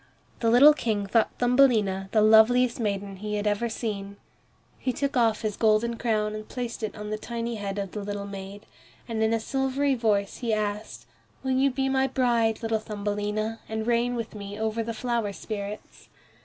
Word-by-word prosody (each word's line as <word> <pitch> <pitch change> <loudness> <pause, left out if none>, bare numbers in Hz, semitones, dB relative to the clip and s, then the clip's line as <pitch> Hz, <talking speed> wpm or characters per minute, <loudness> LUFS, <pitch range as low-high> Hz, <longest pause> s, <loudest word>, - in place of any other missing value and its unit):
The 230 - +2
little 270 +6 +8
King 215 -8 -1
thought 220 +2 +2
Thumbelina 230 -7 +3
the 215 -2 +4
loveliest 230 +3 +5
maiden 200 -3 -2
he 210 +2 -4
had 205 0 -2
ever 210 +3 0
seen. 200 -3 -4 0.6
He 255 - -1
took 280 +2 -2
off 225 -3 +2
his 215 -2 -1
golden 225 +1 +2
crown 215 -3 0
and 215 0 -7
placed 245 -2 -5
it 215 - -3
on 210 0 -6
the 215 - -2
tiny 235 +1 -4
head 200 -1 -4
of 195 -2 -3
the 210 - -5
little 205 0 -4
maid, 200 0 -8 0.4
and 225 -2 -2
in 220 0 +2
a 230 - +2
silvery 270 +3 0
voice 210 -5 0
he 230 -3 0
asked, 210 0 -4 0.4
"Will 265 - -1
you 265 +2 +3
be 270 +1 -1
my 265 0 +2
bride, 235 -4 +1
little 225 -1 0
Thumbelina, 210 +1 -3
and 220 0 -3
reign 240 +1 +1
with 230 -1 -4
me 205 -1 -7
over 220 +1 -1
the 230 0 -4
flower 235 -3 -1
spirits?" 205 0 -7
220 Hz, 185 wpm, -26 LUFS, 205-240 Hz, 0.6 s, little